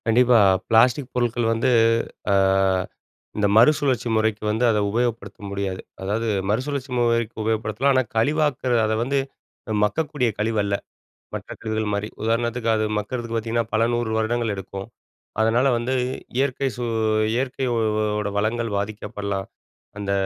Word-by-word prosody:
கண்டிப்பா! 120 +1 +5 0.3
பிளாஸ்டிக் 125 +4 +3
பொருள்கள் 120 -1 0
வந்து, 115 +3 +1 0.6
அ - - +4 1.0
இந்த 105 -1 +2
மறுசுழற்சி 130 -1 +4
முறைக்கு 110 -1 0
வந்து 110 +3 0
அத 110 - +2
உபயோகப்படுத்த 115 -3 -2
முடியாது. 100 -1 -3 0.2
அதாவது, 105 +4 -1 0.2
மறுசுழற்சி 130 +4 -2
முறைக்கு 115 -1 +1
உபயோகப்படுத்தலாம். 110 +4 +1
ஆனா, 130 - +4
கழிவாக்குற, 140 +1 +1
அதை 110 0 0
வந்து 135 +3 0 0.6
மக்கக்கூடிய 145 +2 0
கழிவு 110 0 0
அல்ல. 100 0 0 0.6
மற்ற - - -6
கழிவுகள் 110 -1 -2
மாரி 100 +1 -1 0.2
உதாரணத்துக்கு 115 +1 0
அது 110 0 +1
மக்குறதுக்கு 115 +2 -4
பாத்தீங்கன்னா, 115 +1 -1
பல 115 +1 +3
100 120 -1 -1
வருடங்கள் 110 0 0
எடுக்கும். 95 0 -7 0.5
அதனால 115 +4 +3
வந்து 120 +3 -2 0.4
இயற்கை 135 0 0
சூ 120 - -3 0.5
இயற்கையோட 110 -5 0
வளங்கள் 115 +2 0
பாதிக்கப்படலாம். 100 -1 -4 0.5
அந்த 100 -1 -3
115 Hz, 125 wpm, -23 LUFS, 105-125 Hz, 1.0 s, கண்டிப்பா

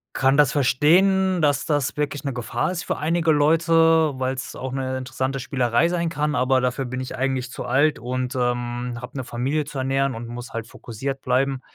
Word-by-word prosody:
kann 135 +1 +3
das 145 -3 +5
verstehen, 180 +8 +3
dass 145 -3 +1
das 145 -3 0
wirklich 145 -1 -2
'ne 140 - -2
Gefahr 120 +6 -2
ist 175 - -4
für - - -2
einige 165 +1 +1
Leute, 160 +1 +4
weil's 130 0 -3
auch 130 0 -5
'ne 130 -1 -2
interessante 130 +1 -3
Spielerei 130 +3 +1
sein 170 -1 -1
kann, 150 -2 -1
aber 130 +1 +2
dafür 125 +1 -1
bin 130 +1 -5
ich 130 - -6
eigentlich 130 -1 -2
zu - - -6
alt 140 +4 +2
und, 125 +2 -3
ähm, 120 -1 -2
habe 125 +3 -9
'ne 130 - -2
Familie 130 +6 -2
zu 145 -1 -7
ernähren 135 0 0
und 115 +1 -6
muss 120 +1 -8
halt 115 -1 -4
fokussiert 135 +4 -6
bleiben. 130 +1 +1
135 Hz, 195 wpm, -23 LUFS, 125-150 Hz, -, das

